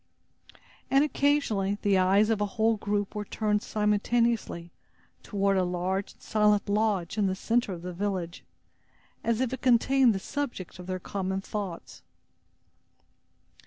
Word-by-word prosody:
And 275 +1 +5
occasionally, 280 -10 +1
the 200 -2 +3
eyes 200 +4 +4
of 215 -2 0
a - - +3
whole 225 +1 +3
group 205 -1 -2
were 210 - -3
turned 210 0 -1
simultaneously 210 -4 0 0.5
toward 200 -1 0
a 185 - +3
large 180 +2 -2
and - - -31
silent 210 -1 +2
lodge 205 -2 0
in 200 - +3
the 190 - -1
center 230 +2 0
of 175 -2 -7
the 180 0 -5
village, 185 -2 -3 0.8
as 230 +1 0
if 260 -1 -1
it 260 - -5
contained 255 -1 +4
the - - -2
subject 240 - -5
of 180 - -9
their 185 0 -2
common 190 +1 -3
thoughts. 195 -3 -6
205 Hz, 145 wpm, -28 LUFS, 190-225 Hz, 0.8 s, And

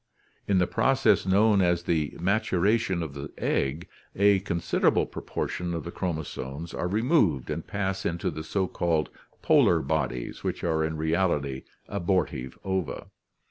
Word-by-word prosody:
In 100 - +3
the 90 - +4
process 135 -1 +2
known 100 +1 +4
as 85 -1 +2
the 80 -5 0
maturation 95 0 +1
of 75 -4 -6
the 70 +1 -7
egg, 75 +6 -1 0.3
a 100 0 +5
considerable 85 -3 +1
proportion 90 -1 -4
of 85 - -4
the 85 - -6
chromosomes 80 -3 -4
are 90 - -2
removed 105 - +2
and - - -4
pass 95 0 -2
into 85 0 -1
the 80 - -6
so 95 +4 0
called 80 -4 0 0.3
polar - - +5
bodies 60 -1 -2
which - - -3
are 80 -2 +1
in 80 0 -2
reality 80 -4 0 0.2
abortive 85 -8 -1
ova. 95 -6 -3
85 Hz, 140 wpm, -27 LUFS, 80-95 Hz, 0.3 s, a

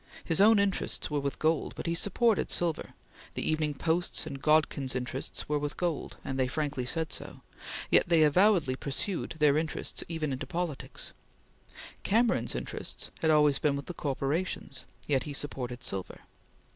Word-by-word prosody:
His 165 +2 +2
own 220 +2 +7
interests 200 -5 0
were 150 - +1
with 140 0 -2
gold, 160 0 +1
but - - -6
he 170 - +1
supported 205 +5 +2
silver; 170 -3 -1 0.4
the - - -1
Evening 155 -2 +1
Post's 165 +4 0
and 140 -3 -6
Godkin's 150 -4 +2
interests 125 +2 -3
were 150 0 +1
with 145 0 -4
gold, 175 -4 -2
and 135 0 -3
they 130 - +3
frankly 140 -2 -2
said 160 +3 -1
so, - - -6 0.5
yet - - +5
they 165 -2 +6
avowedly 165 -3 +4
pursued 155 +7 -2
their 150 -1 +4
interests 160 -1 -3
even 155 -4 -2
into 130 - -4
politics; 170 -5 -4 0.9
Cameron's 230 +3 +2
interests - - -4
had 160 - +2
always 150 -2 +5
been 145 -2 +2
with 140 - -5
the 180 - -6
corporations, 140 0 -2 0.2
yet 135 -3 +2
he 150 - -5
supported 125 -3 -4
silver. 95 -6 -4
150 Hz, 160 wpm, -30 LUFS, 140-170 Hz, 0.9 s, own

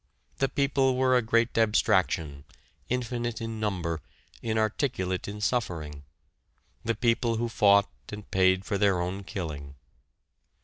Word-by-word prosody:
The 135 - +2
People 135 -2 +1
were 130 0 +3
a 125 - +4
great 115 +1 +1
abstraction, 90 - +2 0.5
infinite 120 -1 -2
in 115 -1 -5
number, 90 -6 -2 0.4
inarticulate 110 -4 -1
in 105 +1 -6
suffering 80 - -2 0.8
the 115 0 0
people 115 +1 +1
who 120 +1 -1
fought 100 -3 +4 0.2
and 105 -1 -7
paid 95 0 +3
for 100 - -1
their 100 -3 +3
own 90 +3 -3
killing. 75 -8 -6
105 Hz, 125 wpm, -28 LUFS, 95-115 Hz, 0.8 s, a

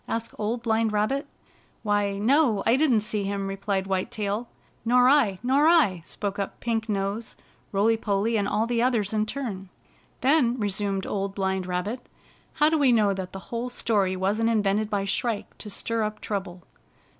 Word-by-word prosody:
asked 230 0 -3
Old 230 +3 -2
Blind 225 -1 +1
Rabbit. 215 +7 0 0.6
"Why, 205 -2 +1
no, 230 -1 +3
I 230 - +4
didn't 265 -6 +3
see 215 0 -2
him," 200 0 -2
replied 195 0 -2
White 190 -1 -1
Tail. 210 +2 -3 0.2
" - - -36
Nor 245 +2 +4
II 255 -9 +4
Nor 275 +5 +3
I! 290 - +4
" - - -29
spoke 200 -1 -4
up 200 - -4
Pink 225 -1 -2
Nose, 200 +2 -2 0.4
Roily 215 +3 +3
Polly, 215 +1 0
and 205 -2 +1
all 215 +2 +1
the 235 0 0
others 230 -5 +1
in 215 0 +1
turn. 210 -8 -5 0.3
" - - -34
Then," 255 -3 +3
resumed 200 -2 -1
Old 195 -1 -3
Blind 190 -2 -1
Rabbit, 195 +7 -3 0.5
"how 300 -1 +3
do 320 -1 +1
we 275 -3 +4
know 210 -4 +3
that 190 -1 -5
the 195 +4 -10
whole 235 +2 -2
story 205 -6 0
wasn't 205 +5 +1
invented 210 -1 +1
by 200 -2 -1
Shrike 220 +2 -2
to 210 - -8
stir 230 +3 -2
up 215 0 -2
trouble?" 190 -4 -5
215 Hz, 185 wpm, -26 LUFS, 195-235 Hz, 0.6 s, I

